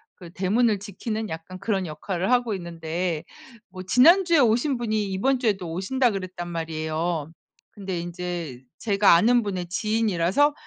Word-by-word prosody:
그 175 -2 -12
대문을 210 +3 +1
지키는 215 +2 -5
약간 165 +3 -7
그런 195 -2 -1
역할을 175 +6 -3
하고 245 -3 +2
있는데 170 -1 -3 0.5
뭐 185 0 -8
지난주에 335 - +5
오신 245 +3 +2
분이 215 -4 -1
"이번 260 +7 +1
주에도 195 -8 -1
오신다." 240 +8 +1
그랬단 185 -3 -5
말이에요. 160 -1 -3 0.4
근데 190 -3 -5
인제 175 -6 -5 0.2
제가 200 -3 +4
아는 235 +7 +4
분의 185 -4 -3
지인이라서 215 - +1
190 Hz, 325 characters per minute, -24 LUFS, 170-225 Hz, 0.5 s, 지난주에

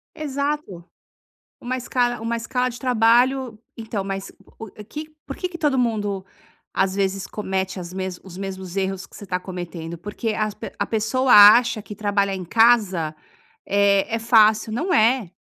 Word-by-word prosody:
Exato, 285 - -3 0.8
uma 255 +1 -3
escala 245 -1 -1
uma 230 +1 -2
escala 250 +2 -1
de 240 - -8
trabalho, 250 0 +2 0.2
então, 220 -3 -4
mas 195 0 -5 0.3
o 225 - -6
o - - -12 0.2
que 305 +7 -8 0.2
por 275 - -6
que 365 - -2
que 355 -2 -9
todo 295 -6 +1
mundo, 205 -5 -1 0.5
às 190 -1 +1
vezes, 195 0 -1
comete 190 -2 -3
as 175 0 -8
mes 185 -1 -4
os 185 -2 -11
mesmos 190 -2 -6
erros 195 -1 -2
que - - -17
você 205 - -10
tá 180 -1 -2
cometendo? 175 -2 -7
Porque 210 +5 -4
as 215 -1 -1
pe - - -8
a - - -1
pessoa 230 +4 0
acha 215 +2 +8
que 210 0 -10
trabalhar 200 -1 0
em 185 - -6
casa 195 -6 +3 0.5
é 200 +1 +2
é 230 - 0
fácil, 220 -1 +4
não 340 - -1
é. 230 - +3
215 Hz, 170 wpm, -22 LUFS, 190-240 Hz, 0.8 s, acha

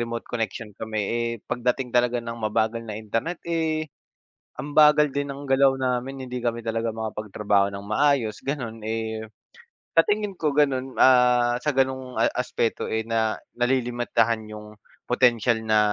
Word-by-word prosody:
remote 115 0 -4
connection 110 -2 -4
kami. 110 -1 -3
Eh 120 0 0 0.2
pagdating 125 +1 -1
talaga 120 0 +2
ng 115 0 -6
mabagal 110 +1 0
na 105 -2 -6
internet, 115 +11 -3
eh, 160 -2 -1 0.7
ang 145 +2 -6
bagal 150 -1 +6
din 140 0 -2
ng 140 +1 -7
galaw 135 0 +4
namin, 130 +1 -2
hindi 125 0 -4
kami 115 -1 -1
talaga 115 0 -1
makapagtrabaho 105 -2 0
nang 100 0 -7
maayos, 115 -1 +1
ganun. 120 -6 -3
Eh, 110 0 -3 0.7
sa 165 - +8
tingin 210 -1 0
ko 155 - +1
ganun, 135 -3 +1
ah, 125 -1 +5
sa 150 - +1
ganoong 130 -1 0
a 115 - +4
aspeto, 125 -2 -1
eh, 110 0 0
na 110 -1 +1 0.2
nalilimitahan 120 -3 +1
'yung 105 0 -10 0.3
potensyal 120 -2 +3
na 110 -1 +4
120 Hz, 150 wpm, -24 LUFS, 110-135 Hz, 0.7 s, sa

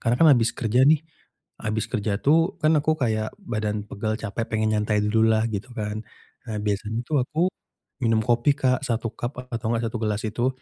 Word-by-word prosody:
Karena, 120 +1 +1
kan, - - +8
abis 115 -2 +2
kerja, 125 +4 +3
nih, 155 0 +4 0.6
abis 110 0 -1
kerja 105 -3 -1
tuh, 165 +6 +3
kan 155 +1 +4
aku 155 +2 +1
kayak 110 -4 -1
badan 105 - -3
pegal, 110 +1 -2
capek, 110 +1 -3
pengen 110 -1 +1
nyantai 105 0 +1
dulu 110 +1 +3
lah, 110 - +1
gitu 105 +5 -4
kan. 105 0 -3 0.5
Nah, 110 - -3
biasanya 105 +2 -1
tuh, 145 0 +1
aku, 155 +4 -4 0.6
minum 115 -1 +3
kopi, 120 +4 +3
Kak, 130 -2 +2
1 115 -2 -2
cup, 120 +3 -5
a - - -16
atau 115 -1 -2
nggak 115 0 0
1 120 - -4
gelas 105 -1 -1
itu, 120 +4 0
115 Hz, 200 wpm, -24 LUFS, 110-130 Hz, 0.6 s, kan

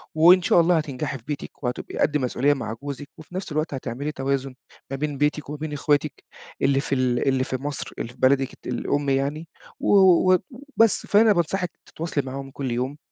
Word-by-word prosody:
وإن 175 +4 +7
شاء 175 - +4
الله 170 +1 +3
هتنجحي 145 -2 -3
في 115 - -19
بيتِك 145 -1 -6
وهتبقي 125 -1 -4
قد 150 0 +2
مسؤولية 135 +2 +1
مع 110 -5 -4
جوزِك 145 0 -6
وفي 160 +3 -12
نَفْس 185 -2 -4
الوقت 155 0 -1
هتعملي 135 +3 -4
توازُن 135 -1 -2 0.4
ما 135 - -2
بين 145 -1 -3
بيتِك 150 0 0
وما 150 - -5
بين 155 0 -5
إخواتِك 145 0 0 0.4
اللي 135 0 +3
في 140 - -1
ال 125 -1 +1
اللي 130 -1 +2
في 130 - -3
مصر 140 +1 -5
اللي 115 - -3
في - - -24
بلدِك 135 0 +3
الت - - -14
الأم 140 +3 -1
يعني 140 +4 -1 0.3
و - - -3
و 185 -1 +6
و 245 +7 -2 0.2
بس. 225 -2 +4
فأنا 215 +1 +5
بانصحِك 175 0 -1
تتواصلي 160 -3 -3
معاهم 135 +1 -6
كل 135 -2 -4
يوم، 130 +4 -2
145 Hz, 200 wpm, -24 LUFS, 135-155 Hz, 0.4 s, وإن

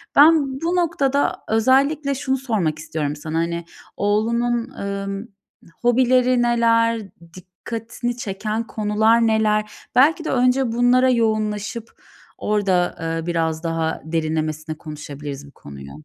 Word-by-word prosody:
Ben 285 -3 +5
bu 340 +2 0
noktada 285 -6 +1
özellikle 275 +5 +2
şunu 265 -1 -1
sormak 205 - -1
istiyorum 150 -2 -3
sana 155 +2 -5
hani 170 0 -2 0.3
oğlunun, 235 +4 0
ımm, 200 -2 -5 0.5
hobileri 250 +1 +3
neler? 230 -1 +2 0.3
Dikkatini 225 +6 -6
çeken 215 +2 -3
konular 220 +2 +2
neler? 215 -1 +1 0.2
Belki 315 +5 +4
de - - -2
önce 255 -1 +2
bunlara 245 +2 +3
yoğunlaşıp 220 -1 -1 0.5
orada, 190 -4 +1
eee, 165 0 -3
biraz 165 -1 -1
daha 165 -1 -2
derinlemesine 155 -1 -2
konuşabiliriz 145 -2 -8
bu - - -15
konuyu. 70 - -11
220 Hz, 110 wpm, -21 LUFS, 170-245 Hz, 0.5 s, Ben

